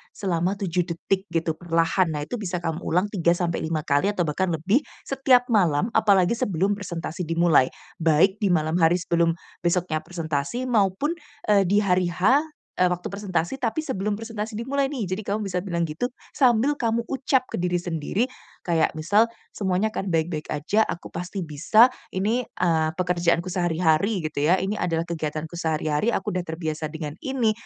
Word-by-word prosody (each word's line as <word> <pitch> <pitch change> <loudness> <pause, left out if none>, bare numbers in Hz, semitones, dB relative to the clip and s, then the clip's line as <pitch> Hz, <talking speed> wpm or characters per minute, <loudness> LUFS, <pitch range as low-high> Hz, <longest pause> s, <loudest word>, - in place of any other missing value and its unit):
selama 185 0 0
7 180 -2 -1
detik 190 +3 -2
gitu 165 -3 -2
perlahan. 165 +2 +2
Nah 145 - -2
itu 240 +10 -5
bisa 180 -4 -3
kamu 165 -1 -2
ulang 180 +5 0
3 170 -4 +2
sampai 170 -1 -1
5 160 -1 -2
kali 145 +5 +2
atau 205 -3 0
bahkan 165 +4 -1
lebih 175 - +2 0.2
setiap 265 -2 +3
malam, 185 -1 +2
apalagi 200 -4 +4
sebelum 195 -5 +1
presentasi 180 -4 -4
dimulai, 165 -5 +4 0.3
baik 165 +5 +3
di 205 - +1
malam 165 -1 +1
hari 165 +1 +5
sebelum 170 -1 +1 0.2
besoknya 175 -2 0
presentasi 165 - -3
maupun, 225 - +1 0.4
eee, 200 -2 +4
di 205 +3 +3
hari 180 -2 +2
H, 200 - +3 0.4
eee, 180 - +5
waktu 180 0 -3
presentasi 200 +3 -2
tapi 250 +6 -1
sebelum 210 -8 -2
presentasi 220 0 -5
dimulai 270 +4 0
nih. 270 -5 -4
Jadi 190 - -3
kamu 210 +1 -1
bisa 180 -2 -1
bilang 175 -2 -2
gitu, 160 +10 -2 0.2
sambil 255 +1 +3
kamu 230 0 0
ucap 265 -1 +1
ke - - -3
diri 180 0 0
sendiri 175 +4 -1 0.4
kayak, 165 -2 +1
misal, 205 +9 +3 0.2
"Semuanya 195 +2 0
akan 195 - -3
baik-baik 160 -1 -1
aja, 165 +9 +2
aku 175 - -6
pasti 180 +2 -4
bisa, 170 - +4 0.2
ini, 210 +6 +1
eee, 165 -5 +1
pekerjaanku 175 -1 +1
sehari-hari," 175 +2 +1
gitu 150 -1 -1
ya, 180 - +5
"ini 200 +2 -1
adalah 165 -1 0
kegiatanku 160 0 -4
sehari-hari, 160 +3 0
aku 190 - -2
sudah 185 - 0
terbiasa 160 -2 -3
dengan 155 -2 -5
ini, 260 -5 +1
180 Hz, 170 wpm, -24 LUFS, 165-210 Hz, 0.4 s, hari